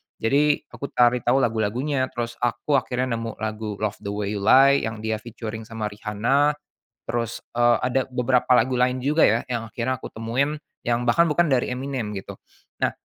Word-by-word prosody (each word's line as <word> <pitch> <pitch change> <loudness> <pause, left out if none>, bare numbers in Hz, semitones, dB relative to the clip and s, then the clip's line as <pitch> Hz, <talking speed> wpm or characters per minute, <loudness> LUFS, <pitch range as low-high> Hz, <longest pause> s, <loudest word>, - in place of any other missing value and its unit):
Jadi, 145 +6 +2
aku 140 - -6
cari 120 0 +4
tahu 130 +3 +2
lagu-lagunya, 120 +5 0
terus 120 -1 -5
aku 130 +4 +1
akhirnya 125 -1 -2
nemu 115 -1 -5
lagu 110 -1 -4
Love 105 0 -3
the - - -8
Way 105 0 -2
You - - -5
Lie, 140 +1 +7
yang 110 -1 -6
dia 110 -1 -1
featuring 110 -1 -7
sama 110 -2 -4
Rihanna, 120 +8 +1 0.5
terus, 115 -1 -2 0.2
eee, 120 -1 +4
ada 130 +1 +2
beberapa 125 0 +1
lagu 125 +2 +2
lain 125 +1 +1
juga 150 +5 +2
ya, 115 +2 +4
yang 115 -3 -4
akhirnya 130 +2 -1
aku - - -8
temuin, 130 +7 -1 0.2
yang 120 0 0
bahkan 170 +8 +4
bukan 170 +2 +3
dari 125 -2 +2
Eminem 130 -4 -3
gitu. 95 - -8 0.5
Nah, - - +2
120 Hz, 180 wpm, -24 LUFS, 110-130 Hz, 0.5 s, Lie